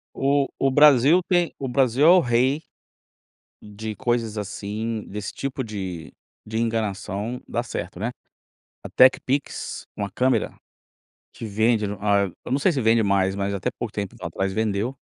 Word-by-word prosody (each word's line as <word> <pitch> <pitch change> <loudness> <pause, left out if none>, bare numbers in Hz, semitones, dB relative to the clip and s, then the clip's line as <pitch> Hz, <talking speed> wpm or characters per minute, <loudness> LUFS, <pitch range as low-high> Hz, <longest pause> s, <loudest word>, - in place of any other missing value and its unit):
O 140 0 +2
o 135 -1 +2
Brasil 145 +4 +6
tem 175 -3 +2
o 135 - -3
Brasil 130 +2 +2
é - - +8
o 185 +1 +8
rei 130 +4 +1 1.0
de 105 +1 -7
coisas 115 -3 -1
assim 105 +2 -4
desse 105 0 -5
tipo 135 -1 -4
de 95 -6 -6 0.4
de 110 +1 -2
enganação, 110 0 -2
dá 120 - -1
certo, 90 -6 -6
né. 115 +4 -2 0.7
A - - -5
TecPix, 130 +2 +2
uma 100 -1 -3
câmera, 130 +5 +1 0.8
que - - -8
vende, 110 +1 +1 0.2
ah, 100 -2 +2
eu - - -7
não 135 - +2
sei 175 +5 +2
se 135 - -1
vende 115 0 +3
mais, 95 -2 +2
mas 100 0 -2
até 95 - -2
pouco 115 -3 -6
tempo 100 -2 -5
atrás 95 0 -2
vendeu. 110 +4 -1
115 Hz, 155 wpm, -23 LUFS, 100-130 Hz, 1.0 s, é